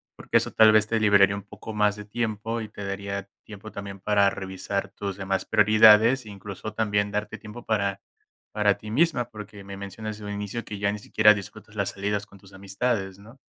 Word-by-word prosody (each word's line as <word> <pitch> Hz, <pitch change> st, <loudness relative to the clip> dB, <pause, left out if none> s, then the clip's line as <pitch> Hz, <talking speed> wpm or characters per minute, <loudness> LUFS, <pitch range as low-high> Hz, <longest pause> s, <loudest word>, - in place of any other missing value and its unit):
porque, -, -, +1 dB
eso -, -, -1 dB
tal 110 Hz, -1 st, +6 dB
vez 110 Hz, 0 st, +4 dB
te 115 Hz, -, 0 dB
liberaría 100 Hz, -2 st, +5 dB
un 100 Hz, -, -7 dB
poco 105 Hz, +2 st, -10 dB
más 105 Hz, -1 st, +2 dB
de 105 Hz, -, -8 dB
tiempo 115 Hz, +1 st, -3 dB
y 110 Hz, -, -7 dB
te 105 Hz, -1 st, -8 dB
daría 100 Hz, 0 st, -4 dB, 0.2 s
tiempo 105 Hz, 0 st, -10 dB
también 100 Hz, -1 st, -7 dB
para 100 Hz, 0 st, +3 dB
revisar 95 Hz, +1 st, -4 dB
tus 100 Hz, -2 st, -5 dB
demás 95 Hz, -1 st, -1 dB
prioridades, 110 Hz, +4 st, +6 dB
incluso 100 Hz, +1 st, -8 dB
también, 105 Hz, -2 st, 0 dB
darte 105 Hz, +1 st, -3 dB
tiempo 110 Hz, +3 st, -11 dB
para 100 Hz, -3 st, 0 dB, 0.5 s
para 105 Hz, -1 st, +2 dB
ti 105 Hz, -, -9 dB
misma, 130 Hz, -2 st, +1 dB
porque 105 Hz, -2 st, -10 dB
me 100 Hz, 0 st, -8 dB
mencionas 100 Hz, +2 st, -6 dB
desde 105 Hz, -, -10 dB
un -, -, -3 dB
inicio 105 Hz, +3 st, -4 dB
que 105 Hz, -1 st, -7 dB
ya 100 Hz, 0 st, +1 dB
ni 105 Hz, +1 st, -3 dB
siquiera 105 Hz, +1 st, +5 dB
disfrutas 105 Hz, +1 st, -9 dB
las 100 Hz, -2 st, -1 dB
salidas 100 Hz, +1 st, -2 dB
con 100 Hz, -1 st, -18 dB
tus 100 Hz, 0 st, -18 dB
amistades, 95 Hz, 0 st, -2 dB
¿no? 115 Hz, +6 st, -15 dB
105 Hz, 205 wpm, -25 LUFS, 100-110 Hz, 0.5 s, tal